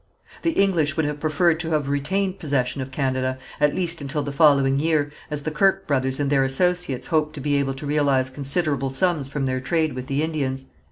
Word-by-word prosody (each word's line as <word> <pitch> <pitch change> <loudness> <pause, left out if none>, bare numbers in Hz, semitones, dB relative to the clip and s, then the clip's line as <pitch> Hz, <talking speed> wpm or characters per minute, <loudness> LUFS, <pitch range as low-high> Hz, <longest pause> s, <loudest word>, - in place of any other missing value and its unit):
The 330 - 0
English 170 - +2
would 160 - +2
have 145 0 -3
preferred 160 +2 +2
to 165 -1 -4
have 150 -3 0
retained 185 +8 -1
possession 135 -3 -1
of 130 - -5
Canada, 130 -1 -1 0.2
at 150 0 +3
least 175 -3 -2
until 145 +1 -2
the 145 - -4
following 140 -2 +4
year, 150 -2 +1 0.2
as 150 -1 -4
the 155 - -2
Kirke 195 +5 +2
brothers 130 -2 0
and 145 -1 0
their 135 -2 +4
associates 140 0 0
hoped 155 -2 +1
to - - -6
be 145 +1 0
able 135 -1 -1
to 135 - -7
realize 140 -3 +1
considerable 140 0 0
sums 145 +1 0
from 135 0 -3
their 130 -1 -1
trade 155 +3 0
with 130 0 -6
the 140 +1 0
Indians. 135 -4 -2
145 Hz, 210 wpm, -23 LUFS, 135-160 Hz, 0.2 s, following